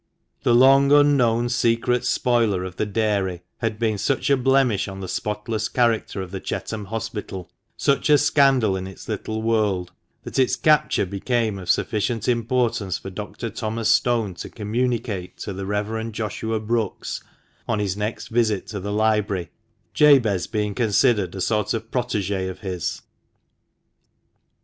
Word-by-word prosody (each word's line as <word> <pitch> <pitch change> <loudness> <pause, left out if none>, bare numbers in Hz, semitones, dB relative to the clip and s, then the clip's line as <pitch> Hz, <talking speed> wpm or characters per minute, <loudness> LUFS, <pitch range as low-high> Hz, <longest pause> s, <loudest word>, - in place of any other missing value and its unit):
The 120 - +3
long 135 +2 +6
unknown 125 -5 +4
secret 120 +1 +1
spoiler 115 -7 +1
of 95 -1 -7
the 110 - -1
dairy 100 -4 -1 0.2
had 115 -1 -2
been 110 -2 0
such 135 +3 0
a - - +6
blemish 130 -5 +2
on 95 -1 -7
the 95 - -5
spotless 105 +3 -3
character 115 -5 0
of 90 - -10
the 95 - -4
Chetham 105 +1 -4
Hospital 105 -4 -5
— - - -49
such 140 +2 +2
a 150 - +7
scandal 135 -8 +3
in 95 0 -4
its 95 - -11
little 110 +1 -3
world 105 -6 0 0.2
— - - -47
that - - -4
its 130 - +3
capture 150 -9 +3
became 105 +2 -1
of 90 -2 -8
sufficient 110 +1 0
importance 120 -4 0
for 95 - -8
Dr. 105 +3 -6
Thomas 110 +1 -2
Stone 115 -6 +2
to - - -7
communicate 110 -3 -2
to 100 - -5
the 95 0 -5
Reverend 110 +2 -2
Joshua 110 +1 -2
Brookes 110 -2 -2 0.5
on 115 - 0
his 100 -3 -1
next 105 +2 -4
visit 110 -4 +1
to 105 - -4
the 100 +2 -4
library, 105 -4 0 0.4
Jabez 125 - +4
being 105 -1 -2
considered 105 -4 +2
a 95 - -4
sort 105 +3 0
of 115 0 -6
prot/gJ 100 -6 -1
of 95 - -9
his. 90 -4 -4
110 Hz, 155 wpm, -23 LUFS, 100-120 Hz, 0.5 s, a